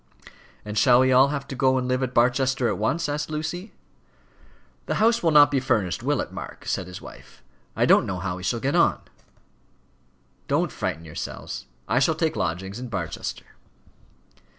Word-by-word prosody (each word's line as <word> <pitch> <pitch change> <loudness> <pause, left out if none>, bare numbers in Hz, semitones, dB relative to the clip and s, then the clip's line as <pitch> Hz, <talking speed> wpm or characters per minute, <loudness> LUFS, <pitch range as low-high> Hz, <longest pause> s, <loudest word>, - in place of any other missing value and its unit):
"And 105 0 -1
shall 125 +2 +6
we 130 0 +3
all 130 +2 +6
have 140 -1 -4
to 135 - -6
go 130 0 +2
and 125 -1 -1
live 130 +1 0
at 130 -1 -1
Barchester 125 +1 +2
at 105 -4 -2
once?" 165 +10 0
asked 150 +1 -3
Lucy. 160 +6 -4 1.2
"The - - -1
house 230 +2 +3
will 170 - +3
not 150 -2 +7
be 140 - +2
furnished, 115 -9 0
will - - 0
it, - - -6
Mark?" - - -9
said 90 - -2
his 90 0 -9
wife. - - -14 0.3
"I - - +2
don't - - +5
know 95 - -3
how 90 -1 -3
we - - -8
shall 115 +6 -1
get 135 +4 -1
on." - - +3 1.5
"Don't - - +1
frighten 80 +1 -4
yourselves. 80 - -7 0.2
I 125 - +2
shall 155 +4 +2
take 160 0 0
lodgings 95 +4 -3
in 125 - -6
Barchester." 95 -8 -5
130 Hz, 180 wpm, -24 LUFS, 100-145 Hz, 1.5 s, not